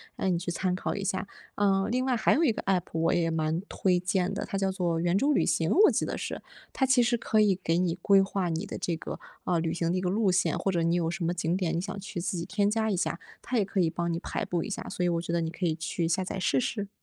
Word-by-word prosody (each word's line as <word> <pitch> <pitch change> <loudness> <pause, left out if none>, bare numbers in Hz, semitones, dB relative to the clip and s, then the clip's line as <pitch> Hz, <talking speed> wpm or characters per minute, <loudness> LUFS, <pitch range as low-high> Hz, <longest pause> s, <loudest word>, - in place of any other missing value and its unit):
让 190 - 0
你 - - +1
去 175 - -4
参 180 +1 -1
考 185 - -3
一 200 - -4
下。 195 0 -2 0.3
嗯， 195 -1 +2
另 255 +1 +1
外 260 -2 +2
还 220 - +3
有 325 - +2
一 240 - +3
个 - - -4
APP 190 -3 +1
我 165 +1 +2
也 170 -1 +1
蛮 160 0 0
推 180 -2 +1
荐 180 0 0
的， - - -3
它 195 - -3
叫 195 0 +1
做 175 -4 -1
圆 175 +2 +2
周 285 +8 +3
旅 - - +2
行， 165 0 +1
我 420 +4 +6
记 - - 0
得 - - -3
是。 - - -5 0.3
它 265 - +1
其 260 -2 +4
实 240 0 +2
可 220 -1 +2
以 195 -3 +3
给 165 -1 +1
你 175 -2 +1
规 195 +1 +5
划 195 -1 -1
你 165 +3 -2
的 - - -6
这 170 - -2
个， 160 - -7 0.2
呃， 175 -2 +1
旅 165 0 -1
行 170 0 0
的 180 - 0
一 - - -1
个 180 - 0
路 200 0 +2
线， 180 +1 +1
或 195 - 0
者 175 -2 0
你 170 +1 +2
有 165 -2 0
什 175 0 -3
么 170 - +1
景 170 0 -1
点 170 -4 -1
你 170 - 0
想 195 +1 -5
去 185 -3 -5
自 180 +1 -2
己 170 - -3
添 205 0 +1
加 220 0 +1
一 200 - +1
下， 180 - -1 0.2
它 250 - -2
也 210 - +2
可 190 0 0
以 165 - +2
帮 170 +1 -2
你 - - -1
排 - - -3
布 175 -2 -1
一 - - -6
下， 210 - -5
所 180 - -2
以 - - +2
我 170 -1 0
觉 170 0 -4
得 170 - +1
你 165 - -2
可 175 +2 -4
以 160 -2 +1
去 160 +1 -2
下 175 +3 +1
载 190 +1 -4
试 140 -7 +2
试。 205 - -3
180 Hz, 335 characters per minute, -28 LUFS, 170-200 Hz, 0.3 s, 我